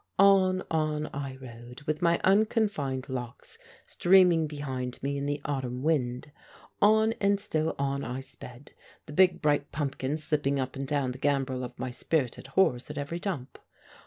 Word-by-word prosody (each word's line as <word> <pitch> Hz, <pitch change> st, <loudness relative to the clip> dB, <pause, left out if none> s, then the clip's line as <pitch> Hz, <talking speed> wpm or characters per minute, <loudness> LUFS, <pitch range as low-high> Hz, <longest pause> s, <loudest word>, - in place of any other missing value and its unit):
On, 190 Hz, -1 st, +5 dB
on 155 Hz, -1 st, 0 dB
I 135 Hz, -1 st, -4 dB
rode 125 Hz, +1 st, -11 dB
with 155 Hz, +1 st, -2 dB
my 170 Hz, -1 st, +3 dB
unconfined 195 Hz, -, +1 dB
locks 125 Hz, -3 st, -7 dB, 0.2 s
streaming 175 Hz, -3 st, +4 dB
behind 130 Hz, -4 st, -4 dB
me 140 Hz, +1 st, -1 dB
in 140 Hz, 0 st, -2 dB
the 145 Hz, 0 st, -1 dB
autumn 130 Hz, -3 st, -3 dB
wind. 140 Hz, -3 st, 0 dB, 0.5 s
On 220 Hz, +2 st, +5 dB
and 200 Hz, 0 st, +3 dB
still 160 Hz, -4 st, -1 dB
on 140 Hz, 0 st, -1 dB
I 125 Hz, +1 st, -4 dB
sped, 130 Hz, 0 st, -11 dB, 0.3 s
the 150 Hz, -, -9 dB
big, 180 Hz, +1 st, +4 dB
bright 145 Hz, -1 st, +1 dB
pumpkin 140 Hz, -1 st, -2 dB
slipping 145 Hz, -3 st, 0 dB
up 130 Hz, 0 st, -3 dB
and 135 Hz, 0 st, -4 dB
down 140 Hz, -3 st, 0 dB
the 125 Hz, -, -9 dB
gambrel 135 Hz, -2 st, 0 dB
of 125 Hz, 0 st, -7 dB
my 130 Hz, -, -4 dB
spirited 130 Hz, -1 st, -2 dB
horse 150 Hz, -11 st, +3 dB
at 150 Hz, -, -7 dB
every 145 Hz, +4 st, -3 dB
jump. 155 Hz, -10 st, -5 dB
145 Hz, 160 wpm, -28 LUFS, 130-165 Hz, 0.5 s, On